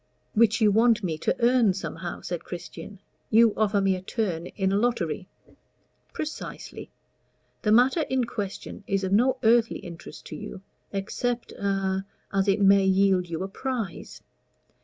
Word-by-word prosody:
"Which 230 0 +4
you 210 -1 +5
want 225 +1 +4
me 160 -4 -2
to - - 0
earn 240 -6 +4
somehow?" 175 -2 -5
said 175 -2 -4
Christian. 175 +2 -8 0.3
"You 225 0 +5
offer 210 -1 +2
me 195 -1 +2
a 185 - -6
turn 185 -4 -2
in 190 0 -1
a - - +2
lottery?" 200 -6 0 0.8
"Precisely. 310 0 -6 0.7
The 210 - +1
matter 255 +8 +5
in 260 -1 +1
question 205 -3 -5
is 195 0 0
of 190 - -1
no 255 +5 +3
earthly 230 0 +4
interest 170 -2 -10
to - - -7
you, 185 - -8 0.3
except 235 +5 -2
a 195 -1 -1 0.3
as 195 0 +1
it 195 +1 +3
may 195 0 +6
yield 190 -2 +3
you 165 +2 -3
a - - -3
prize. 225 -3 -5
200 Hz, 155 wpm, -26 LUFS, 190-230 Hz, 0.8 s, may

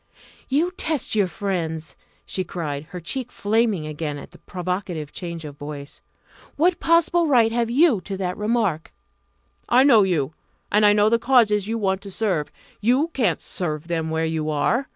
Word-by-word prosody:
"You 310 +7 +2
test 315 -6 -1
your 205 -3 +3
friends!" 165 -5 -3 0.3
she 185 - -2
cried, 155 -5 -4
her 180 +3 -8
cheek 245 - -3
flaming 210 -5 +1
again 150 -1 -4
at - - -10
the - - -16
provocative 180 -4 -4
change 170 -3 -6
of 145 -1 -9
voice. 145 -1 -8 0.5
"What 345 +4 +2
possible 335 0 +3
right 235 -6 +4
have 235 0 0
you 260 - +4
to 195 -1 -4
that 180 -1 -2
remark?" 210 -7 -1 0.8
"I 250 +2 +6
know 250 -6 +6
you, 160 -7 0 0.4
and 210 0 +5
I - - +7
know 210 +1 +4
the 230 +1 +3
causes 225 -5 +3
you 225 +1 -1
want 190 -3 0
to 200 - -8
serve. 185 -7 -1 0.3
You 255 +9 +2
can't 220 - 0
serve 155 -2 -4
them 165 -2 -1
where 160 0 0
you 160 -1 -2
are. 155 - 0
195 Hz, 175 wpm, -23 LUFS, 160-235 Hz, 0.8 s, I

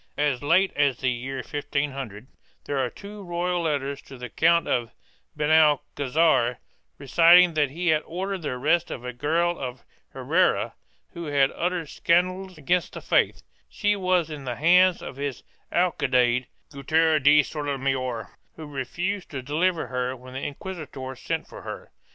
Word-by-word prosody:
As 145 -4 0
late 185 +7 +3
as 140 -4 +2
the 130 -1 0
year 130 +2 -4
1500 140 -7 -3 0.4
there 140 -1 -2
are 130 -2 0
two 205 +5 -10
royal 175 0 -1
letters 140 -3 -2
to 135 - -12
the 125 0 -7
Count 170 +6 +3
of 120 -2 0 0.5
Benalcazar 150 -3 +3 0.4
reciting 170 +5 +6
that 150 -3 +2
he 170 +5 -2
had 155 -1 +3
ordered 190 +2 -4
the 150 - -3
arrest 155 +7 +1
of 125 - -6
a 125 - -4
girl 165 +7 0
of 125 -2 -6 0.3
Herrera - - +1 0.4
who 170 -1 -6
had 140 -2 +2
uttered 175 -2 -2
scandals 185 +2 0
against 175 +4 0
the - - -7
faith; - - +1 0.3
she 205 -1 0
was 185 -4 +1
in 145 -2 -7
the 125 -1 -3
hands 180 +4 +4
of 130 - -8
his 140 -2 -4 0.3
alcaide, 125 -8 +2 0.2
Gutierre 155 +3 +2
de 145 +1 +6
Sotomayor, 135 - -3 0.2
who 160 - -8
refused 175 +8 -4
to 135 -3 -6
deliver 165 +5 0
her 125 +1 -2
when 130 0 -13
the 130 - -5
inquisitor 145 -5 -6
sent - - -4
for - - -11
her. - - -8
150 Hz, 155 wpm, -25 LUFS, 130-170 Hz, 0.5 s, reciting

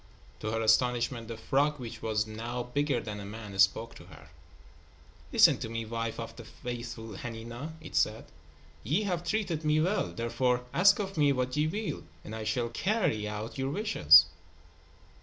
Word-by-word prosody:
To 110 - -3
her 115 +1 -1
astonishment, 120 +1 +2
the 115 -1 -6
frog, 145 +5 +1
which 120 -3 -7
was 110 -1 0
now 115 +3 -4
bigger 140 +1 0
than 105 -2 -6
a - - -7
man, 105 -1 -8
spoke 110 +4 +3
to - - -13
her. - - -15 1.0
"Listen - - +6
to 110 - -4
me, 115 0 -3
wife 115 0 -3
of - - -6
the - - -8
faithful 120 -3 -7
Hanina," 120 +7 -7
it 160 - -10
said. 110 +1 +1 0.6
"Ye 170 +10 +1
have 180 -4 -1
treated 175 -5 -1
me 150 0 +3
well. 185 +7 +1
Therefore, 125 +2 0
ask 195 +3 +6
of 195 -3 -4
me 145 -1 +5
what 125 -1 -1
ye 150 +1 +2
will, 210 +6 -3 0.2
and 110 - -6
I 110 -1 -5
shall 115 +2 0
carry 115 - 0
out 105 +5 -5
your 135 0 -1
wishes." 80 - +6
120 Hz, 175 wpm, -30 LUFS, 110-150 Hz, 1.0 s, Listen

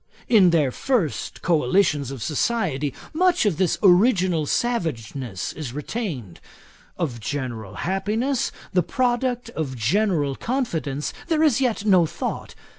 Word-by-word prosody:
In 205 -6 +6
their 155 -6 +2
first 210 - -1
coalitions 155 -2 +2
of 135 -5 -6
society, 150 - 0 0.2
much 355 -3 +3
of 195 -7 +1
this 185 -1 +1
original 185 - +4
savageness 135 - -2
is 145 -6 -6
retained. 145 - -5 0.6
Of 135 -9 -2
general 115 -5 -4
happiness, 215 +8 -1 0.2
the 180 - +4
product 245 +3 -1
of 150 - -4
general 150 - +1
confidence, 160 - -2
there 320 -2 +2
is 270 -5 +3
yet 230 -5 0
no 185 -5 +5
thought. - - -5
175 Hz, 120 wpm, -23 LUFS, 140-230 Hz, 0.6 s, In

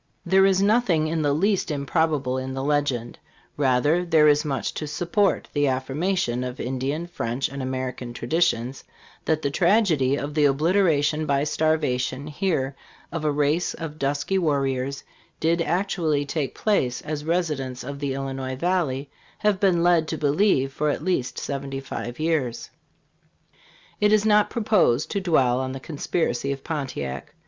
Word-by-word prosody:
There 190 +2 +5
is 195 0 +3
nothing 200 -7 +3
in 160 0 -1
the 145 -1 +2
least 190 +7 +1
improbable 145 -2 0
in 130 0 -5
the 135 - -3
legend; 140 -5 -1 0.4
rather, 145 +5 +2
there 160 -3 +4
is 150 0 +4
much 140 -3 -2
to 150 - -4
support 175 +7 0
the 145 -1 +2
affirmations 135 0 -1
of 125 0 -5
Indian, 135 +6 -2
French 130 -7 -2
and 140 +1 -6
Amer 130 0 -2
ican 120 -1 -8
traditions, 130 -2 0 0.4
that 160 -1 0
the 140 - 0
tragedy 170 - +3
of 145 +1 -4
the 150 -1 +3
obliteration 155 0 +2
by 140 0 +2
starvation 145 -4 0
here 150 -4 -1 0.4
of 165 -2 -4
a 150 - +2
race 150 +4 +1
of 155 -2 -7
dusky 145 +7 0
warriors 135 -4 -1 0.4
did 165 +1 +1
actually 165 -4 0
take 145 -1 -3
place 130 - 0
as 150 -1 -4
residents 150 -7 -2
of 140 +2 -6
the 140 -2 -2
Illinois 135 -1 -4
valley 150 -4 -1 0.3
have 210 -3 +1
been 180 -4 +3
led 170 -2 +3
to 160 - -3
believe 145 -3 +2
for 150 +2 0
at 145 - -2
least 170 -9 -1
seventy 135 -1 -4
five 125 -2 -6
years. 155 -7 -1 1.3
It 210 0 +3
is 215 0 +4
not 210 -1 +4
proposed 210 - +2
to 200 - -1
dwell 130 -9 +2
on 130 0 -3
the 135 - -6
Conspiracy 140 -2 -2
of 135 -1 -5
Pontiac. 130 - -5
150 Hz, 155 wpm, -24 LUFS, 135-170 Hz, 1.3 s, There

